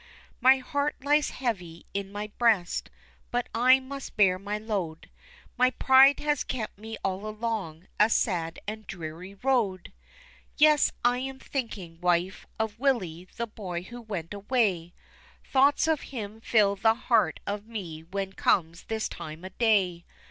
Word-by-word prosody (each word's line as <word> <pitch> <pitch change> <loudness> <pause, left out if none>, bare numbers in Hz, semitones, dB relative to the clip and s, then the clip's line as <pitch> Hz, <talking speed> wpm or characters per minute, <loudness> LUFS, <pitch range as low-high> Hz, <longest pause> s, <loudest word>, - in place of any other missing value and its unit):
My 260 +2 +6
heart 285 +3 -1
lies 295 +1 +3
heavy 180 -10 -4
in 195 -1 -3
my 205 +1 -5
breast, 220 -7 +2 0.4
but 245 0 -1
I 255 +3 +6
must 270 +1 -8
bear 185 -3 +4
my 205 +2 -3
load, 195 -7 -4 0.5
My 255 0 +6
pride 265 +2 +6
has 295 -2 +1
kept 220 -5 -5
me 220 +1 -7
all 195 +2 -2
along 215 -7 -4
a 210 - +6
sad 170 -8 0
and 215 -1 -6
dreary 175 +2 -7
road. 205 -6 0 0.6
Yes, 300 -1 +5
I'm 255 +2 +1
thinking, 205 -12 -5
wife, 180 +1 0
of 220 0 -3
Willie, 185 - 0
the 235 - -1
boy 185 -6 -6
who 240 +5 -9
went 195 -6 -5
away 200 -5 0 0.5
Thoughts 280 +3 +3
of 320 -2 +1
him 220 -4 -6
fill 210 -3 +3
the 220 +3 +3
heart 225 -8 +2
of 205 +1 -4
me 180 -9 -6
when 190 +3 -4
comes 170 -3 +1
this 220 -1 -2
time 155 +3 -8
of 185 - -9
day. 195 -7 +2
210 Hz, 150 wpm, -28 LUFS, 185-245 Hz, 0.6 s, My